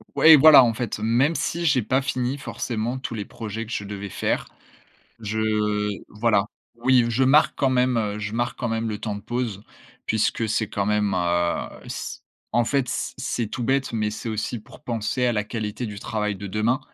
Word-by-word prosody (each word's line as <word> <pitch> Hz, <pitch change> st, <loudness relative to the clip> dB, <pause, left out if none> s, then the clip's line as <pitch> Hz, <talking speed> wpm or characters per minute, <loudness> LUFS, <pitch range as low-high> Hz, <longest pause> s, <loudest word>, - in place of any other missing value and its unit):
Ouais 160 Hz, -, +7 dB
et -, -, +12 dB
voilà 145 Hz, -1 st, +9 dB
en 115 Hz, -2 st, +2 dB
fait, 110 Hz, -2 st, -4 dB
même 120 Hz, +9 st, +2 dB
si 170 Hz, +1 st, -2 dB
j'ai 145 Hz, -5 st, +3 dB
pas 130 Hz, +5 st, +1 dB
fini 130 Hz, 0 st, -2 dB
forcément 120 Hz, -2 st, -3 dB
tous 125 Hz, -, -5 dB
les 105 Hz, -, -3 dB
projets 110 Hz, +1 st, -6 dB
que 115 Hz, -, -11 dB
je 100 Hz, -, -3 dB
devais 100 Hz, 0 st, -6 dB
faire, -, -, -1 dB, 0.7 s
je 105 Hz, -1 st, 0 dB, 0.2 s
voilà 105 Hz, -1 st, +2 dB, 0.3 s
oui, 125 Hz, 0 st, +3 dB
je 125 Hz, +3 st, +2 dB
marque 145 Hz, +4 st, +5 dB
quand 135 Hz, -, +2 dB
même, 125 Hz, -1 st, +2 dB
heu, 105 Hz, -1 st, -1 dB
je 105 Hz, +1 st, -4 dB
marque 120 Hz, +1 st, -1 dB
quand 120 Hz, -, -2 dB
même 115 Hz, 0 st, -1 dB
le 105 Hz, -, -3 dB
temps 105 Hz, -2 st, -3 dB
de 100 Hz, -, -7 dB
pause, 120 Hz, -4 st, -3 dB, 0.4 s
puisque 110 Hz, 0 st, 0 dB
c'est 110 Hz, 0 st, 0 dB
quand 100 Hz, -1 st, -1 dB
même, 105 Hz, -1 st, +1 dB
heu, 85 Hz, -1 st, 0 dB, 0.2 s
c -, -, -5 dB, 0.3 s
en 120 Hz, -, +4 dB
fait, 135 Hz, -1 st, 0 dB
c'est -, -, -3 dB
c'est 120 Hz, -3 st, -2 dB
tout 120 Hz, -, -4 dB
bête, 135 Hz, +2 st, +1 dB
mais 110 Hz, -2 st, 0 dB
c'est 110 Hz, -, -6 dB
aussi 110 Hz, +2 st, -3 dB
pour -, -, -16 dB
penser 120 Hz, +2 st, -1 dB
à 120 Hz, -, +2 dB
la 105 Hz, -, 0 dB
qualité 110 Hz, +2 st, -4 dB
du 105 Hz, -2 st, -7 dB
travail 105 Hz, -2 st, -2 dB
de 100 Hz, +1 st, -7 dB
demain. 110 Hz, +6 st, +1 dB
115 Hz, 205 wpm, -24 LUFS, 105-125 Hz, 0.7 s, et